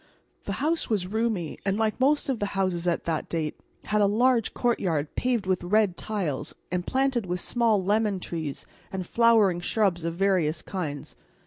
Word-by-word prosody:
The 200 Hz, -, -2 dB
house 310 Hz, +10 st, 0 dB
was 205 Hz, -5 st, +1 dB
roomy, 210 Hz, -5 st, -2 dB
and 195 Hz, 0 st, 0 dB
like 220 Hz, +1 st, 0 dB
most 285 Hz, +3 st, +2 dB
of 260 Hz, -5 st, -1 dB
the 205 Hz, -, 0 dB
houses 180 Hz, -2 st, 0 dB
at 170 Hz, -, +1 dB
that 160 Hz, -2 st, -2 dB
date 160 Hz, -3 st, -2 dB, 0.3 s
had 210 Hz, 0 st, +1 dB
a 200 Hz, -, +5 dB
large 235 Hz, +2 st, +2 dB
courtyard 175 Hz, -, 0 dB
paved 245 Hz, -5 st, 0 dB
with 185 Hz, -1 st, 0 dB
red 200 Hz, 0 st, +2 dB
tiles 170 Hz, -10 st, -3 dB, 0.2 s
and 180 Hz, 0 st, -2 dB
planted 260 Hz, -5 st, +1 dB
with 180 Hz, +1 st, -2 dB
small 225 Hz, -2 st, +1 dB
lemon 205 Hz, -1 st, +1 dB
trees 160 Hz, -5 st, -5 dB, 0.3 s
and 190 Hz, -2 st, -4 dB
flowering 220 Hz, -5 st, +4 dB
shrubs 180 Hz, -2 st, +1 dB
of 165 Hz, 0 st, -2 dB
various 175 Hz, -5 st, +1 dB
kinds. 155 Hz, -7 st, -5 dB
195 Hz, 175 wpm, -26 LUFS, 175-225 Hz, 0.3 s, a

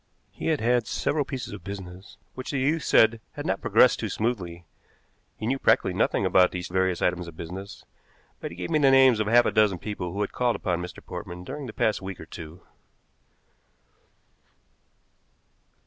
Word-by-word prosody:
He -, -, -6 dB
had 160 Hz, -3 st, +1 dB
had 120 Hz, 0 st, +2 dB
several 150 Hz, -1 st, 0 dB
pieces 130 Hz, -2 st, -6 dB
of -, -, -9 dB
business 95 Hz, -1 st, -9 dB, 0.2 s
which 130 Hz, -, -7 dB
the 140 Hz, -, -1 dB
youth 150 Hz, +5 st, +1 dB
said 110 Hz, -4 st, +4 dB
had -, -, -6 dB
not -, -, -1 dB
progressed -, -, +4 dB
too -, -, -3 dB
smoothly. 90 Hz, -7 st, -3 dB, 0.7 s
He 110 Hz, -, -5 dB
knew 135 Hz, +4 st, 0 dB
practically -, -, +3 dB
nothing -, -, +1 dB
about 90 Hz, -1 st, +5 dB
these 90 Hz, -1 st, -5 dB
various 95 Hz, 0 st, 0 dB
items 90 Hz, -1 st, 0 dB
of 80 Hz, -1 st, -11 dB
business, 95 Hz, +3 st, -8 dB, 0.5 s
but -, -, -5 dB
he 85 Hz, -, -11 dB
gave 90 Hz, -1 st, -5 dB
me 155 Hz, -, +3 dB
the 140 Hz, -2 st, +5 dB
names 130 Hz, -3 st, +6 dB
of 110 Hz, -, 0 dB
half 120 Hz, +2 st, +5 dB
a -, -, +1 dB
dozen 105 Hz, -4 st, +3 dB
people 90 Hz, -2 st, -5 dB
who 100 Hz, +3 st, -3 dB
had 100 Hz, -, -1 dB
called 125 Hz, -2 st, +1 dB
upon 90 Hz, -3 st, -2 dB
Mr. 90 Hz, 0 st, -9 dB
Portman 90 Hz, +1 st, -7 dB
during 140 Hz, +6 st, -6 dB
the -, -, -6 dB
past 105 Hz, -1 st, 0 dB
week 95 Hz, -1 st, -7 dB
or -, -, -9 dB
two. 85 Hz, +2 st, -10 dB
100 Hz, 185 wpm, -26 LUFS, 90-125 Hz, 0.7 s, names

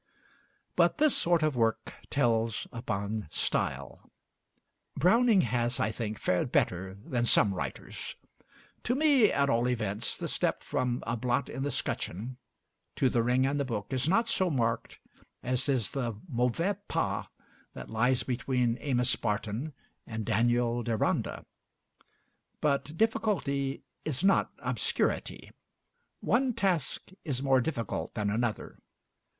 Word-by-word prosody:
But -, -, +3 dB
this 305 Hz, -2 st, +4 dB
sort 170 Hz, -2 st, +2 dB
of 155 Hz, -3 st, +1 dB
work 115 Hz, -1 st, 0 dB, 0.2 s
tells 115 Hz, -4 st, +1 dB
upon 105 Hz, -, -3 dB
style. -, -, -2 dB, 0.9 s
Browning 215 Hz, -, +5 dB
has, 120 Hz, +1 st, 0 dB
I 110 Hz, -, +1 dB
think, 110 Hz, -1 st, -4 dB
fared 90 Hz, +7 st, 0 dB
better 95 Hz, +1 st, 0 dB
than 120 Hz, +4 st, -2 dB
some 105 Hz, -3 st, +5 dB
writers. 90 Hz, -, -5 dB, 0.7 s
To 245 Hz, -, +1 dB
me, 280 Hz, -6 st, +5 dB
at 140 Hz, 0 st, +2 dB
all 120 Hz, -1 st, +2 dB
events, 110 Hz, -4 st, -1 dB
the -, -, -3 dB
step -, -, -1 dB
from 125 Hz, -1 st, -1 dB
'A 115 Hz, +1 st, -1 dB
Blot 125 Hz, +3 st, 0 dB
in 135 Hz, -, -5 dB
the 145 Hz, -, 0 dB
'Scutcheon' 120 Hz, -, -3 dB, 0.6 s
to 130 Hz, -, +3 dB
'The 120 Hz, -, +2 dB
Ring 125 Hz, +3 st, +2 dB
and 140 Hz, +2 st, 0 dB
the -, -, +2 dB
Book' 115 Hz, -2 st, -4 dB
is 130 Hz, +3 st, +1 dB
not 230 Hz, +6 st, +3 dB
so 185 Hz, -1 st, +2 dB
marked 115 Hz, -5 st, -1 dB, 0.4 s
as 130 Hz, +3 st, 0 dB
is 125 Hz, -7 st, +2 dB
the 120 Hz, -6 st, -3 dB
mauvais 140 Hz, -, 0 dB
pas -, -, -1 dB, 0.5 s
that -, -, -8 dB
lies 125 Hz, +3 st, +2 dB
between 125 Hz, -2 st, 0 dB
'Amos 125 Hz, -3 st, +1 dB
Barton' 110 Hz, +7 st, -2 dB, 0.4 s
and 110 Hz, -2 st, -4 dB
'Daniel 120 Hz, +2 st, +2 dB
Deronda.' 115 Hz, -2 st, -1 dB, 1.1 s
But 145 Hz, +1 st, 0 dB
difficulty 150 Hz, -11 st, 0 dB, 0.2 s
is 155 Hz, +1 st, -2 dB
not 195 Hz, 0 st, +3 dB
obscurity. -, -, -1 dB, 0.7 s
One 250 Hz, 0 st, +2 dB
task 185 Hz, -, 0 dB
is 135 Hz, -4 st, -3 dB
more 135 Hz, -2 st, +4 dB
difficult 120 Hz, -7 st, -3 dB
than 105 Hz, -2 st, 0 dB
another. 115 Hz, 0 st, -2 dB
125 Hz, 135 wpm, -30 LUFS, 115-145 Hz, 1.1 s, Browning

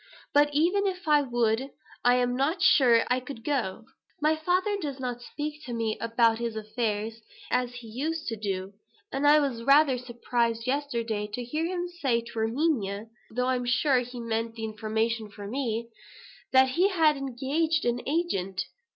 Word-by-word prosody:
But 290 Hz, 0 st, +5 dB
even 355 Hz, +7 st, +2 dB
if 365 Hz, -3 st, -4 dB
I 300 Hz, -1 st, +5 dB
would, 240 Hz, -1 st, 0 dB, 0.3 s
I 245 Hz, 0 st, +5 dB
am 245 Hz, 0 st, +1 dB
not 290 Hz, +7 st, 0 dB
sure 255 Hz, -10 st, +6 dB
that -, -, 0 dB
I 255 Hz, -, +1 dB
could 255 Hz, -2 st, -9 dB
go. 235 Hz, -8 st, -2 dB, 0.3 s
My 305 Hz, +1 st, +3 dB
father 365 Hz, +6 st, +1 dB
does 280 Hz, -4 st, -4 dB
not 245 Hz, -2 st, -4 dB
speak 300 Hz, +4 st, -6 dB
to 245 Hz, -, -5 dB
me 225 Hz, -2 st, -1 dB
about 230 Hz, 0 st, +3 dB
his 235 Hz, -2 st, -3 dB
affairs, 220 Hz, 0 st, -3 dB, 0.3 s
as 250 Hz, -1 st, +1 dB
he 245 Hz, -2 st, -9 dB
used 310 Hz, +8 st, -3 dB
to 225 Hz, -, -3 dB
do; 195 Hz, -2 st, -4 dB, 0.4 s
so 270 Hz, -, -1 dB
I 290 Hz, +1 st, +6 dB
was 270 Hz, -6 st, -1 dB
rather 275 Hz, 0 st, +5 dB
surprised 235 Hz, -1 st, -1 dB
yesterday 235 Hz, -6 st, -1 dB
to 245 Hz, -, -4 dB
hear 305 Hz, +7 st, -2 dB
him 355 Hz, 0 st, -2 dB
say 275 Hz, -10 st, 0 dB
to 230 Hz, 0 st, -7 dB
Erminia 225 Hz, -4 st, 0 dB, 0.2 s
(though 250 Hz, +3 st, -1 dB
I'm 255 Hz, -1 st, 0 dB
sure 260 Hz, +2 st, +3 dB
he 245 Hz, 0 st, -6 dB
meant 230 Hz, 0 st, -2 dB
the 225 Hz, -, -6 dB
information 220 Hz, 0 st, -1 dB
for 205 Hz, 0 st, -9 dB
me), 230 Hz, 0 st, -2 dB, 0.6 s
that 260 Hz, 0 st, +6 dB
he 345 Hz, +9 st, +3 dB
had 320 Hz, -6 st, +4 dB
engaged 275 Hz, +5 st, -1 dB
an 240 Hz, 0 st, 0 dB
agent." 195 Hz, -, -1 dB
245 Hz, 175 wpm, -28 LUFS, 230-295 Hz, 0.6 s, sure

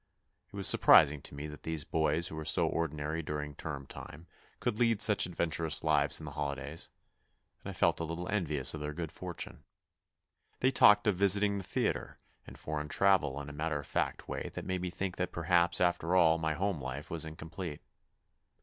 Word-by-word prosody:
It -, -, -12 dB
was 100 Hz, -1 st, +1 dB
surprising 70 Hz, 0 st, +6 dB
to -, -, -4 dB
me 70 Hz, +1 st, -6 dB
that 75 Hz, -1 st, -9 dB
these 80 Hz, -2 st, -3 dB
boys 80 Hz, +2 st, 0 dB
who -, -, -8 dB
were 80 Hz, -, -5 dB
so 75 Hz, -, +3 dB
ordinary 75 Hz, -1 st, -2 dB
during 75 Hz, -1 st, -5 dB
term 70 Hz, -2 st, -6 dB
time 80 Hz, +4 st, -10 dB, 0.4 s
should 105 Hz, -, -1 dB
lead 115 Hz, -3 st, +3 dB
such 105 Hz, -4 st, +4 dB
adventurous 85 Hz, -2 st, 0 dB
lives 75 Hz, -2 st, +2 dB
in 80 Hz, -, -9 dB
the 70 Hz, -, -7 dB
holidays, 70 Hz, +1 st, -4 dB, 0.7 s
and -, -, -6 dB
I -, -, -6 dB
felt -, -, +1 dB
a -, -, -2 dB
little 85 Hz, +2 st, -5 dB
envious 75 Hz, -10 st, +1 dB
of 80 Hz, -, -6 dB
their 75 Hz, 0 st, -4 dB
good 80 Hz, -2 st, -5 dB
fortune. 90 Hz, -1 st, -7 dB, 1.0 s
They 130 Hz, -, +3 dB
talked 105 Hz, -4 st, +6 dB
of 105 Hz, -4 st, +1 dB
visiting 100 Hz, +1 st, +4 dB
the -, -, -7 dB
theatre -, -, -2 dB, 0.3 s
and -, -, -11 dB
foreign 75 Hz, -1 st, -4 dB
travel 85 Hz, -9 st, +2 dB
in 70 Hz, -, -9 dB
a 70 Hz, -, -8 dB
matter 75 Hz, 0 st, -2 dB
of 70 Hz, -, -9 dB
fact -, -, -2 dB
way -, -, -4 dB
that -, -, -6 dB
made 95 Hz, -1 st, -2 dB
me 90 Hz, -, -3 dB
think 95 Hz, +1 st, -4 dB
that 90 Hz, -1 st, -2 dB
perhaps 85 Hz, +1 st, +2 dB
after 90 Hz, 0 st, +1 dB
all 85 Hz, -2 st, +4 dB
my 80 Hz, -1 st, -1 dB
home 95 Hz, -4 st, -2 dB
life 65 Hz, +3 st, -6 dB
was 85 Hz, -1 st, +1 dB
incomplete. 80 Hz, 0 st, -7 dB
80 Hz, 195 wpm, -31 LUFS, 75-90 Hz, 1.0 s, surprising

